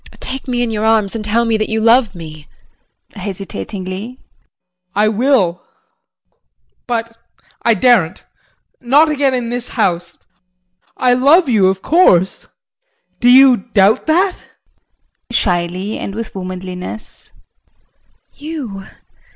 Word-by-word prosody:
Take 265 +1 -5
me 245 -1 -1
in 235 - -2
your 215 -1 -2
arms 220 -3 +2
and 220 - -4
tell 225 +3 +1
me 225 -1 +1
that 215 - -2
you 220 - -1
love 230 -2 +3
me. 155 -3 -10 0.7
JEAN 205 - -10
[Hesitatingly]. 195 - -6 0.8
I 210 +1 +3
will 215 -6 +1 1.3
but 230 -1 -3 0.5
I 230 -1 +3
daren't 200 -6 +2 0.6
not 285 +6 +3
again 280 -3 +1
in 240 -2 -3
this 245 0 -3
house. 175 -7 -2 0.8
I 250 -1 +3
love 285 +7 +4
you 210 -6 +3
of 190 0 -1
course 190 - +3 0.7
do 245 - +3
you 260 0 +7
doubt 205 +1 +1
that? 360 +4 +2
JULIE - - -23
[Shyly 180 +2 -2
and 195 - -6
with 225 0 -6
womanliness]. 185 +1 -6 1.0
You! 275 -11 -7
220 Hz, 120 wpm, -16 LUFS, 190-250 Hz, 1.3 s, you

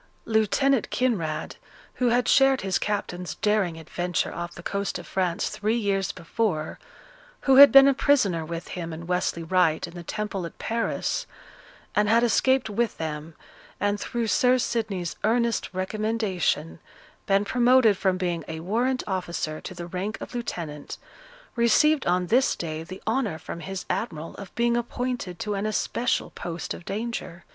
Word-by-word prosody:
Lieutenant 230 +4 +2
Kinraid, 190 -12 -1 0.4
who 250 - 0
had 245 0 +2
shared 270 -1 +5
his 190 -1 0
captain's 180 -4 -3
daring 210 -6 +1
adventure 175 +2 -2
off 175 0 -5
the 170 - -10
coast 200 +1 -2
of - - -9
France 180 -3 -1
three 215 +3 -1
years 195 -4 0
before, 165 -3 -2 0.6
who 270 -1 +4
had 280 +1 +11
been 275 0 +9
a 275 - +5
prisoner 215 - +2
with 165 +1 -6
him 170 -2 -5
and 165 +1 -8
Westley 180 -2 -1
Wright, 165 -2 +2
in 170 - -11
the 175 - -7
Temple 205 +1 -4
at - - -15
Paris, 230 - -2 0.7
and 210 0 +2
had 230 +2 +4
escaped 260 +2 +3
with 220 +1 -1
them, 155 0 -5 0.4
and, 205 +1 0
through 235 +2 -2
Sir 250 +3 +3
Sidney's 215 -8 -2
earnest 235 +1 +1
recommendation, 190 -4 -1 0.5
been 200 +1 +3
promoted 245 -1 +4
from 190 -1 +1
being 175 -3 -2
a 160 0 -5
warrant 240 +8 0
officer 175 -5 -3
to 185 - -8
the 175 0 -6
rank 185 +4 -4
of - - -8
lieutenant, 170 -11 -5 0.6
received 275 +6 +3
on 180 +1 +2
this 250 +9 +3
day 160 -2 -4
the 185 +4 -9
honour 220 -7 0
from 170 - -7
his 185 +3 -6
admiral 165 -8 -3
of 200 - -10
being 235 0 +2
appointed 240 -5 -3
to 210 -2 -3
an 200 +1 -1
especial 235 +3 -1
post 170 0 -5
of 170 - -10
danger. 210 -5 -5
200 Hz, 160 wpm, -26 LUFS, 175-235 Hz, 0.7 s, had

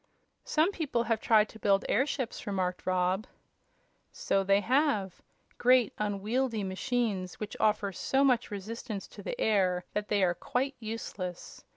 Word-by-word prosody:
"Some 320 +5 +2
people 290 -10 -1
have 225 -1 0
tried 220 -2 +4
to 220 - -13
build 200 -1 +2
airships," 260 -4 -1
remarked 185 -3 -2
Rob. 185 +3 +1 0.8
"So 195 0 0
they 195 +1 +4
have; 250 - +1 0.4
great, 250 -2 +4
unwieldy 210 +3 -1
machines 195 -1 -2
which 215 - -5
offer 210 -2 +2
so 265 +9 +1
much 250 -3 +3
resistance 210 +1 -5
to - - -11
the - - -5
air 185 -4 +2
that 210 0 -2
they 205 -2 +2
are 175 -1 +3
quite 260 +9 -2
useless. 215 -5 -6
215 Hz, 145 wpm, -30 LUFS, 195-245 Hz, 0.8 s, tried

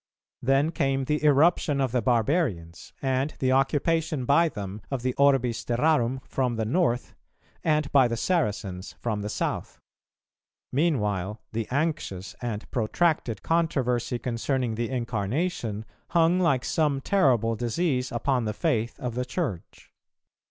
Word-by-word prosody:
Then 135 +5 +2
came 135 -4 0
the 150 +2 -1
irruption 150 0 +4
of 135 -3 +1
the 125 0 +1
barbarians, 115 - 0
and 135 +2 0
the 130 -1 +1
occupation 145 +1 +1
by 165 +6 +4
them 100 -4 -6
of 135 -3 -3
the 130 0 0
orbis 135 -4 +2
terrarum 130 0 +1
from 125 -3 -1
the 110 -1 -1
North, 125 -1 0 0.5
and 150 -2 +1
by 135 -3 +6
the 115 -1 -2
Saracens 105 - -1
from 110 -3 -3
the 105 - -4
South. - - -3 0.9
Meanwhile 105 - 0
the 110 -1 -3
anxious 135 - -2
and 115 -3 -4
protracted 120 - 0
controversy 130 -8 0
concerning 125 0 -1
the 115 +1 -2
Incarnation 115 - -2 0.2
hung 170 +2 +3
like 140 -9 +2
some 150 -4 +1
terrible 130 - +2
disease 125 +3 -1
upon 125 0 0
the 105 - -1
faith 120 -7 -1
of 125 -2 -3
the 125 +2 -1
Church. 125 - -5
130 Hz, 135 wpm, -26 LUFS, 115-150 Hz, 0.9 s, by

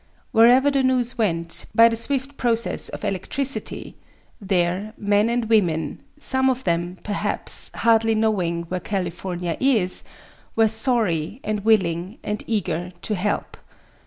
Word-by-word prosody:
Wherever 250 +5 +5
the 275 -1 +2
news 255 -1 +1
went, 170 -6 0
by 230 0 +8
the 230 - 0
swift 270 +4 -2
processes 235 -3 0
of - - -7
electricity, 265 +9 -2 0.4
there 190 +2 0
men 205 +2 +2
and 240 0 0
women, 170 -9 +1 0.2
some 265 -2 +1
of 260 0 -1
them, 175 +1 -1
perhaps, 205 -1 0
hardly 225 -1 +3
knowing 185 -6 0
where 180 +2 -4
California 180 -2 -3
is, 225 -9 +1 0.5
were 225 0 +4
sorry 220 - 0
and 210 -1 -2
willing 190 -2 +1
and 210 0 -3
eager 180 -5 -2
to 215 - -2
help. 205 +1 -2
210 Hz, 130 wpm, -22 LUFS, 180-235 Hz, 0.5 s, by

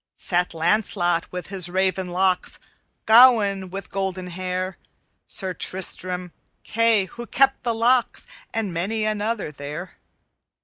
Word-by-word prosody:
"Sat 180 -1 0
Lancelot 175 0 0
with 180 +1 -6 0.2
raven 190 0 0
locks, 185 +1 +1 0.5
Gawaine 220 -5 +6
with 195 0 -7
golden 190 -2 -3
hair, 185 +1 -4 0.5
Sir 190 -2 -3
Tristram, 180 0 -2 0.3
Kay 230 -3 +2
who 235 +5 -9
kept 270 0 +2
the 235 -1 -1
locks, 240 +2 +2 0.3
And 215 -5 -2
many 210 +6 -1
another 215 -4 -2
there. 150 +5 -8
190 Hz, 115 wpm, -23 LUFS, 180-220 Hz, 0.5 s, Gawaine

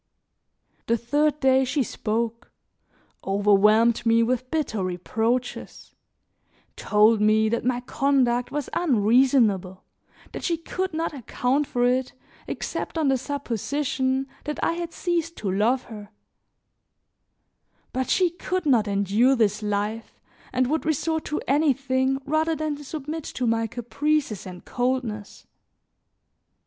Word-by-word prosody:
The 230 - +2
third 290 +6 +1
day 265 -1 +4
she 265 +2 0
spoke, 230 0 -3 0.7
overwhelmed 210 +3 +3
me 230 0 +4
with 250 +1 -1
bitter 270 -11 -1
reproaches, 225 +7 -3 0.8
told 210 +1 +3
me 215 +1 +3
that 235 +1 -1
my 245 0 0
conduct 250 -2 +1
was 295 -2 -3
unreasonable, 230 - +2 0.5
that - - -7
she 340 -2 0
could 370 +2 -4
not 325 0 -2
account 270 +2 -1
for 245 0 0
it 255 +1 +1 0.3
except - - -4
on 310 -4 +2
the 270 - +3
supposition 265 0 -2 0.2
that 300 0 -3
I - - +2
had 340 0 -4
ceased 335 -2 -2
to 200 -3 -2
love 230 +7 +1
her; 210 -3 -10 1.8
but 260 0 -2
she 360 -3 +3
could 370 0 -3
not 240 -7 +3
endure 205 +6 +2
this 210 -3 +1
life 210 +2 -3 0.3
and 255 0 +1
would 310 +5 -1
resort 315 +1 -1
to 300 - -2
anything 270 -2 +1
rather 315 +2 +1
than 300 -1 -3
submit 305 +2 -6
to 255 - -3
my 225 -1 +1
caprices 250 -1 -2
and 180 -1 -10
coldness. 245 -5 -3
255 Hz, 125 wpm, -24 LUFS, 220-295 Hz, 1.8 s, day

